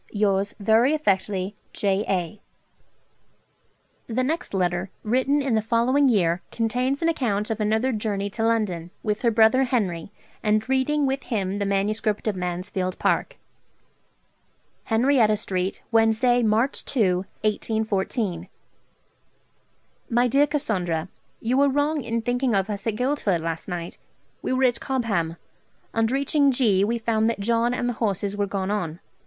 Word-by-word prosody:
'Yours 200 -1 0
very 225 +8 +4
affectly., 195 -6 0 0.2
'J. 200 0 0
A.' 185 +2 -2 1.7
The 255 +3 +1
next 315 +6 -2
letter, 180 -1 -1
written 260 +6 +1
in 270 -3 0
the 220 - +3
following 245 +5 +2
year, 180 -6 +2
contains 250 +6 -1
an - - +3
account 225 -10 0
of 225 - -2
another 220 +4 +1
journey 210 -3 -2
to 225 +2 -3
London, 210 -7 0
with 210 0 -1
her 235 - +3
brother 230 +4 +4
Henry, 200 -8 -1 0.3
and 215 +1 +1
reading 265 +3 +1
with 270 0 -2
him 200 -4 -2
the 200 - -1
manuscript 210 +2 -1
of 210 - 0
'Mansfield 185 +1 -3
Park': - - 0 1.5
'Henrietta 225 -2 +3
Street, 185 -2 -3
Wednesday, 225 +2 +3
March 225 +4 +1
2 195 -9 +2 0.2
(1814). 215 -3 -1 1.6
'MY 240 +1 +3
DEAR 280 +4 +3
CASSANDRA, 185 - -1 0.3
'You 245 +3 0
were 280 0 +4
wrong 290 +1 0
in 230 -1 -2
thinking 245 -1 0
of 195 +2 0
us 200 +1 -5
at 220 - 0
Guildford 245 - 0
last 165 0 -4
night: 175 -2 -5 0.4
we - - -3
were 260 +1 +1
at 245 -2 +3
Cobham. 200 -11 -1 0.6
On 225 0 +2
reaching 280 +3 +2
G. 225 -7 +3
we 230 +3 0
found 225 -1 +1
that 230 - -3
John 235 +3 +1
and 245 - -1
the 245 - 0
horses 200 -2 -1
were 205 0 -1
gone 195 0 -2
on. 175 -6 -3
220 Hz, 145 wpm, -24 LUFS, 195-250 Hz, 1.7 s, very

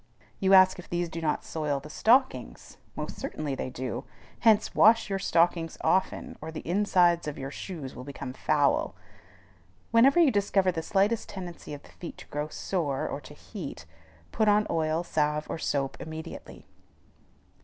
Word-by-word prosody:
You 195 0 +5
ask 185 -1 +6
if 180 - -11
these 175 0 -1
do 165 0 -6
not 155 -2 -1
soil 150 -3 -2
the 150 +2 -11
stockings. 260 - +1 0.2
Most - - -5
certainly 150 -3 -4
they 130 - -3
do. 130 -1 -4 0.4
Hence 220 -3 +4
wash 225 -1 +5
your 195 - 0
stockings 170 -2 +1
often, 190 0 0
or 160 +1 -6
the 160 - -8
insides 175 -3 +3
of 150 - -3
the 135 +1 -6
shoes 150 -6 -7
will 125 - -8
become 130 -2 -7
foul. 145 +1 +1 1.0
Whenever 260 +8 +6
you 320 -6 +6
discover 200 -2 +2
the 165 - -3
slightest 205 +6 +1
tendency 175 -5 -7
of 145 - -13
the - - -17
feet 175 - -9
to - - -11
grow 150 +1 -3
sore 155 -4 -2
or - - -5
to - - -13
heat, - - -8 0.5
put 220 - +1
on 210 0 +4
oil, 160 +1 0
salve, 150 -2 0
or - - -4
soap, 135 -3 -2
immediately. 160 0 -8
170 Hz, 165 wpm, -28 LUFS, 150-195 Hz, 1.0 s, ask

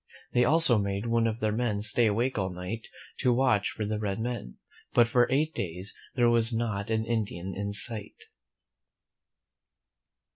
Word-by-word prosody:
They 125 - +4
also 145 -5 +5
made 100 +1 -2
one 115 0 +2
of 110 0 -3
their 110 -1 +1
men 105 -2 -1
stay 110 +2 +2
awake 120 +5 0
all 95 -3 -1
night 90 +6 -6 0.3
to 125 - +3
watch 120 -5 +2
for 105 - -4
the 105 0 -2
red 100 -1 -2
men; 120 - -4 0.4
but 120 -1 +6
for 120 +1 +3
eight 155 +4 +1
days 90 +1 -4 0.2
there 120 -2 +3
was 115 0 +4
not 110 -3 -2
an 110 0 0
Indian 100 -5 -3
in 100 +1 -3
sight. 105 +1 0
110 Hz, 160 wpm, -28 LUFS, 100-120 Hz, 0.4 s, but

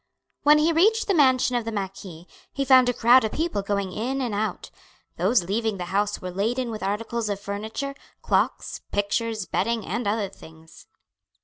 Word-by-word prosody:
When 300 0 +6
he 315 +2 +3
reached 435 +8 +3
the 400 - +1
mansion 260 -5 +3
of 240 - 0
the 225 - -4
marquis 190 -4 -6 0.3
he 275 - -2
found 255 -2 +6
a - - +4
crowd 240 +2 +5
of 220 - -2
people 320 -10 -1
going 200 -1 -2
in 255 +7 -2
and 245 -5 -2
out. 210 -2 -3 0.5
Those 190 +4 +2
leaving 210 +3 -1
the 180 - -4
house 205 +1 0
were 185 - -6
laden 230 +6 -1
with 215 - -6
articles 215 +3 -2
of 200 -1 -2
furniture, 220 +8 -5 0.3
clocks, - - 0
pictures, 215 +1 -1
bedding, 225 +4 -1
and 235 +3 -3
other 205 0 0
things. 160 -4 -16
220 Hz, 180 wpm, -24 LUFS, 200-255 Hz, 0.5 s, When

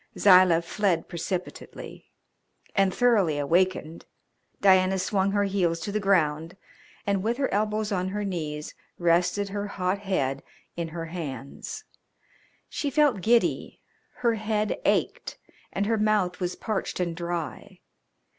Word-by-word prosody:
Zilah 180 -3 +6
fled 180 -1 0
precipitately, 180 +1 -6 0.7
and, 195 -1 +3
thoroughly 205 -10 +3
awakened, 165 +2 0 0.5
Diana 190 -1 +4
swung 190 +1 +1
her 205 0 +2
heels 185 -4 0
to 205 - -4
the 215 - 0
ground 165 -4 +1 0.5
and 200 -1 +1
with 230 +4 -1
her 270 -1 -1
elbows 210 +1 0
on 185 -2 0
her 205 +2 -3
knees 155 -6 -4 0.2
rested 175 +4 +2
her 205 +1 -3
hot 185 0 -1
head 140 -9 -1 0.3
in 170 -1 -3
her 165 0 -6
hands. 150 -5 -6 0.8
She 290 - -3
felt 280 -7 +2
giddy, 230 +4 +1 0.5
her 235 - +5
head 215 - -1
ached - - 0 0.3
and 200 - -1
her 225 +1 +1
mouth 210 -4 +1
was 180 -1 -2
parched 215 -4 -3
and 170 -2 -1
dry. 170 -1 -5
190 Hz, 130 wpm, -26 LUFS, 170-205 Hz, 0.8 s, Zilah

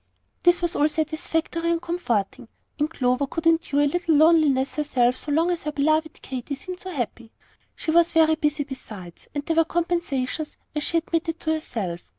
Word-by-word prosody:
This 350 0 +4
was 345 0 0
all 300 +1 +3
satisfactory 320 +2 -1
and 335 0 +1
comforting; 245 - -2 0.3
and 295 +1 +1
Clover 255 -2 0
could 330 +3 -5
endure 325 -3 +3
a - - +4
little 330 +2 +1
loneliness 300 -4 +4
herself 255 -5 +1
so 295 - -4
long 325 +4 +2
as 345 - -2
her 300 - -1
beloved 310 +2 0
Katy 260 +2 -5
seemed 365 +6 -8
so 375 - -7
happy. 240 - -4 0.4
She 315 - -2
was 340 +1 +4
very 320 -1 +4
busy 300 -1 0
besides, 215 -10 -10
and 290 0 -3
there 325 -1 -1
were 330 - +6
compensations, 325 -4 -2 0.2
as 300 - -2
she 335 - +1
admitted 330 0 -1
to 315 - 0
herself. 200 - -4
310 Hz, 180 wpm, -24 LUFS, 275-330 Hz, 0.4 s, were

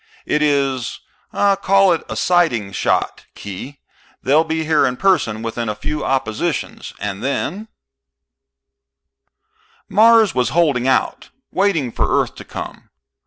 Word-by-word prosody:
It 150 - 0
is 140 -4 0 0.3
call 195 -1 +3
it 165 - -2
a - - -4
sighting 145 - +1
shot, - - -1
Khee. 100 +8 -8 0.5
They'll 150 +4 +4
be 160 0 -2
here 155 -1 +3
in 125 0 -3
person 115 - +1
within 115 0 -3
a 105 - -2
few 150 +8 -4
oppositions. 135 +5 -2
And 100 -1 -4
then 175 +10 -3 1.1
" 65 0 -41
Mars 225 -2 +5
was 125 -3 +1
holding 140 -7 +2
out, 130 - 0 0.2
waiting 170 -11 +1
for - - -1
Earth - - -1
to - - -9
come. - - -8
140 Hz, 130 wpm, -19 LUFS, 115-175 Hz, 1.1 s, Mars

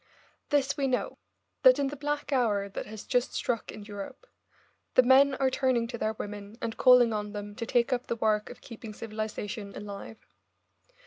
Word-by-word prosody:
This 280 -2 +1
we 275 -1 +1
know, 250 -1 -1 0.4
that - - +7
in 275 -1 0
the 290 - -6
black 295 0 -2
hour 210 -6 +2
that 195 - -6
has 215 -1 -8
just 250 0 0
struck 235 -3 -2
in 210 - -9
Europe, 205 - -8 0.7
the 255 - +7
men 270 +2 +6
are 265 0 +1
turning 255 -3 +1
to 240 - -4
their 215 0 0
women 205 0 -7
and 230 -1 -3
calling 250 -3 +6
on 210 0 -3
them 205 0 -6
to 230 -2 -4
take 245 +2 +2
up 245 0 -2
the - - -1
work 215 -2 +1
of 245 - -11
keeping 220 -2 -9
civilisation 215 -2 -5
alive. 205 +2 -8
230 Hz, 185 wpm, -29 LUFS, 210-260 Hz, 0.7 s, that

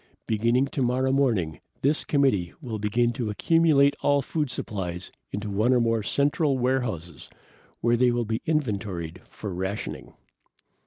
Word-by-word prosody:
Beginning 115 +4 +2
tomorrow 130 -1 0
morning, 115 - +1 0.2
this 145 +3 +3
committee 130 - +1
will 120 -8 -5
begin 120 +3 +1
to 115 -2 -3
accumulate 145 +3 +4
all 145 -1 +3
food 150 +1 -2
supplies 90 -7 -5 0.2
into 105 +1 -4
one 105 +5 +1
or 125 - +4
more 115 -1 +1
central 140 - +1
warehouses 120 - -2 0.5
where 120 +1 +3
they 125 +1 +4
will 120 -1 0
be 110 +1 -2
inventoried 100 - -2
for 105 -3 -6
rationing. 95 +4 -5
120 Hz, 140 wpm, -26 LUFS, 100-135 Hz, 0.5 s, accumulate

